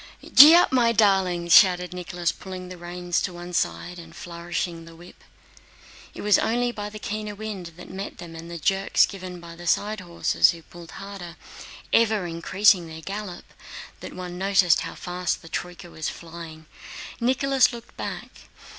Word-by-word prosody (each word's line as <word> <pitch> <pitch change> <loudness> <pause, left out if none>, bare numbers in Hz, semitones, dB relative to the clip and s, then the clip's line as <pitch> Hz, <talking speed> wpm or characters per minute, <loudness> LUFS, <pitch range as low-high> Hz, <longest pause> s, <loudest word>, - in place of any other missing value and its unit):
"Gee 300 +5 +11
up, 350 - +5
my 240 -3 +4
darlings!" 190 -5 +2
shouted 180 -1 +6
Nicholas, 175 -1 -2
pulling 185 -1 -9
the 185 - -9
reins 175 0 -2
to - - -2
one 175 +1 -9
side 175 +1 -2
and 165 0 -12
flourishing 170 -1 -5
the 165 0 -13
whip. 175 +2 -16 0.9
It - - -7
was 205 -1 +5
only 240 +1 +1
by 210 -3 -6
the 215 - -9
keener 210 0 -5
wind 200 -5 -7
that 180 - -11
met 195 +2 -7
them 170 -2 -10
and 165 +1 -9
the 170 - -6
jerks 195 +4 +2
given 185 -2 -8
by 170 -1 -11
the 175 +1 -10
side 210 +4 +1
horses 175 -2 +2
who 170 -2 -4
pulled 170 0 -13
harder—ever 200 +2 -3
increasing 175 +2 +2
their 160 0 -9
gallop—that 195 0 -9
one 180 -1 -7
noticed 195 -3 +4
how - - -6
fast 180 -1 -3
the 165 - -12
troyka 175 0 -6
was 160 - -4
flying. 165 -1 -10 0.5
Nicholas 260 +2 +3
looked 235 -1 -11
back. - - -6
180 Hz, 165 wpm, -24 LUFS, 170-205 Hz, 0.9 s, Gee